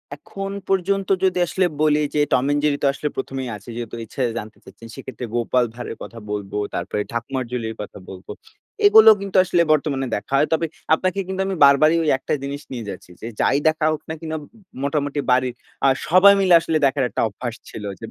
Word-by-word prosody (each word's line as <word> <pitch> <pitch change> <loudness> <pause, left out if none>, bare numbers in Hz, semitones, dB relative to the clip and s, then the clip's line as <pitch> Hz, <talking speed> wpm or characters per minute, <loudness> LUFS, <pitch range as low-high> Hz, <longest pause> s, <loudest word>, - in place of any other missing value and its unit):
এখন 195 -1 -7 0.2
পর্যন্ত 195 +1 0
যদি 185 -1 +2
আসলে 185 +2 +1 0.2
বলি 150 -1 +3
যে, - - +2
'টম 130 0 +3
অ্যান্ড 145 0 +1
জেরি' 145 -1 +1
তো 140 - +4
আসলে 150 - -3
১ম 135 0 -4
এই 125 - -5
আছে। 100 +3 -15
যেহেতু 120 -1 -6
ইচ্ছে 130 - -7 0.2
জানতে 110 -1 -7
চাচ্ছেন। 115 - -13
সেক্ষেত্রে 130 -3 -7
'গোপাল 120 +1 +2
ভাঁড়' 120 +1 -7
এর - - -8
কথা 115 - -10
বলব, 100 -2 -4 0.2
তারপরে 95 +4 -2
'ঠাকুমার 125 +3 -3
ঝুলি'-র 115 -3 -3
কথা 105 - -9
বলব। 95 -1 -11 0.6
এগুলো 220 - +9
কিন্তু 195 -1 -2
আসলে 175 -2 +2
বর্তমানে 140 -3 +1
দেখা 105 +6 -6
হয়। 150 - +3
তবে 160 +1 +1 0.3
আপনাকে 185 +4 0
কিন্তু 190 0 -3
আমি 195 - -2
বারবারই 155 +3 +5
ঐ - - -2
একটা - - -3
জিনিস 140 +1 -5
নিয়ে 120 -5 -6
যাচ্ছি। 90 -2 -9
যে, - - -7
যাই 140 - +3
দেখা 155 0 +1
হোক 155 - -3
না - - -2
কিনা 160 -1 -4 0.5
মোটামুটি 145 0 -1
বাড়ির 125 0 +2 0.3
আ - - +6 0.2
সবাই 185 +4 +7
মিলে 190 -2 +4
আসলে 165 -1 0
দেখার 135 0 +1
একটা - - -2
অভ্যাস 120 +3 -6
ছিল। 105 - -8 0.2
যে 115 - -7
140 Hz, 205 wpm, -21 LUFS, 120-165 Hz, 0.6 s, এগুলো